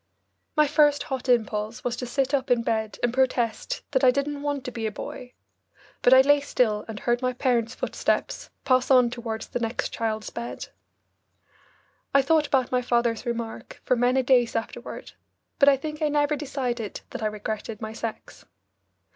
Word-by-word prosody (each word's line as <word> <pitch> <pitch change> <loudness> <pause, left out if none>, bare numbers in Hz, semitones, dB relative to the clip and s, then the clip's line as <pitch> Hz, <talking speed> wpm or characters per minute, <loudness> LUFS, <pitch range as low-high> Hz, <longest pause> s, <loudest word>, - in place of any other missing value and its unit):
My 305 - +6
first 295 0 +3
hot 265 -1 -4
impulse 225 0 0
was 245 -2 -1
to 250 - -4
sit 270 +2 -1
up 275 -2 0
in 240 -2 +3
bed 220 -2 -1
and 240 -1 +1
protest 250 -3 0
that 265 -2 +1
I 255 - +8
didn't 280 +2 -1
want 285 -2 -2
to 250 - -4
be 225 -2 -3
a - - -3
boy, 245 +4 -8 0.7
but 245 - +4
I 260 0 +9
lay 290 +2 +5
still 225 -6 0
and 220 -2 -6
heard 240 +1 0
my 255 0 0
parents' 245 -1 0
footsteps - - -2 0.2
pass 255 -2 +3
on 250 -3 +5
toward 230 -2 -4
the - - -4
next 230 +1 -2
child's 220 -2 -2
bed. 235 0 -6 1.5
I 275 - +6
thought 305 +1 +3
about 260 -3 +1
my 250 0 +2
father's 240 -1 0
remark 235 -1 -5
for 255 - +3
many 250 +2 +2
days 245 -2 +3
afterward, 225 - -5 0.5
but 280 -1 +7
I 275 - +4
think 305 +3 -6
I 305 - +2
never 295 0 +2
decided 255 -6 -4
that - - -6
I 215 - +1
regretted 215 +1 -5
my 220 -1 -6
sex. 225 -1 -7
250 Hz, 180 wpm, -25 LUFS, 230-275 Hz, 1.5 s, I